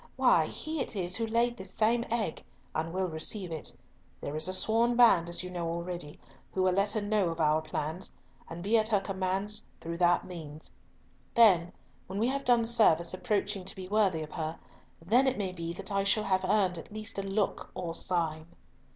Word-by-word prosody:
Why, -, -, +4 dB
he 310 Hz, 0 st, -3 dB
it 245 Hz, -, -3 dB
is 180 Hz, -2 st, -1 dB
who 225 Hz, -1 st, -1 dB
laid 235 Hz, +2 st, +1 dB
this 190 Hz, -2 st, -6 dB
same 230 Hz, +4 st, +2 dB
egg, 220 Hz, -8 st, -2 dB, 0.3 s
and 160 Hz, +1 st, -2 dB
will 185 Hz, +2 st, 0 dB
receive 175 Hz, +3 st, -3 dB
it. 160 Hz, -2 st, -5 dB, 0.4 s
There 145 Hz, -, -5 dB
is 155 Hz, +3 st, +1 dB
a 185 Hz, -, -1 dB
sworn 230 Hz, +5 st, +3 dB
band, 195 Hz, -9 st, +5 dB
as 175 Hz, -, -1 dB
you 180 Hz, -, -6 dB
know 170 Hz, -2 st, -3 dB
already, 170 Hz, -2 st, -5 dB, 0.4 s
who 190 Hz, -, +2 dB
will 185 Hz, -1 st, +3 dB
let 200 Hz, +2 st, +2 dB
her 215 Hz, -, -1 dB
know 205 Hz, -5 st, +1 dB
our 155 Hz, -1 st, +2 dB
plans, 155 Hz, +3 st, -4 dB, 0.4 s
and 170 Hz, +1 st, -7 dB
be 220 Hz, +3 st, +4 dB
at 215 Hz, -, +1 dB
her 215 Hz, -3 st, +3 dB
commands 195 Hz, +2 st, -2 dB
through 170 Hz, 0 st, -5 dB
that 175 Hz, 0 st, +3 dB
means. 155 Hz, -4 st, -9 dB, 0.6 s
Then, 185 Hz, -7 st, +6 dB, 0.4 s
when 190 Hz, -, -5 dB
we 230 Hz, +4 st, +2 dB
have 275 Hz, +1 st, -2 dB
done 240 Hz, -3 st, +4 dB
service 185 Hz, -8 st, +3 dB
approaching 200 Hz, -1 st, -1 dB
to 190 Hz, -, -5 dB
be 185 Hz, -1 st, -7 dB
worthy 195 Hz, -6 st, +2 dB
of 155 Hz, -, -9 dB
her, 160 Hz, 0 st, -4 dB, 0.4 s
then 230 Hz, +11 st, +3 dB
it 260 Hz, -, +1 dB
may 195 Hz, -3 st, -2 dB
be 170 Hz, -2 st, -5 dB
that 180 Hz, -, -6 dB
I 195 Hz, 0 st, +1 dB
shall 205 Hz, +2 st, +2 dB
have 190 Hz, -2 st, +1 dB
earned 185 Hz, -3 st, +2 dB
at -, -, -12 dB
least 215 Hz, 0 st, -5 dB
a -, -, 0 dB
look 195 Hz, +1 st, -1 dB
or 175 Hz, -2 st, -4 dB
sign." 160 Hz, -3 st, -1 dB
190 Hz, 205 wpm, -30 LUFS, 170-215 Hz, 0.6 s, Then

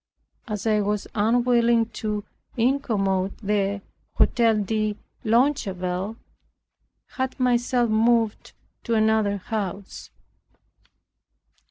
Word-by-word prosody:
As 210 Hz, -2 st, -4 dB
I 215 Hz, -1 st, +3 dB
was 205 Hz, 0 st, -1 dB
unwilling 235 Hz, +1 st, +3 dB, 0.2 s
to 210 Hz, -1 st, -2 dB, 0.3 s
incommode 205 Hz, -7 st, 0 dB
the 200 Hz, -1 st, -1 dB, 0.3 s
Hotel 230 Hz, -2 st, +3 dB
de 215 Hz, 0 st, -1 dB, 0.3 s
Longueville 210 Hz, -6 st, 0 dB
I -, -, -37 dB
had 260 Hz, 0 st, -2 dB
myself 245 Hz, -1 st, +2 dB
moved 225 Hz, 0 st, +1 dB, 0.3 s
to 230 Hz, -, 0 dB
another 220 Hz, -2 st, +2 dB
house. 195 Hz, -1 st, -5 dB
220 Hz, 85 wpm, -24 LUFS, 200-235 Hz, 0.3 s, I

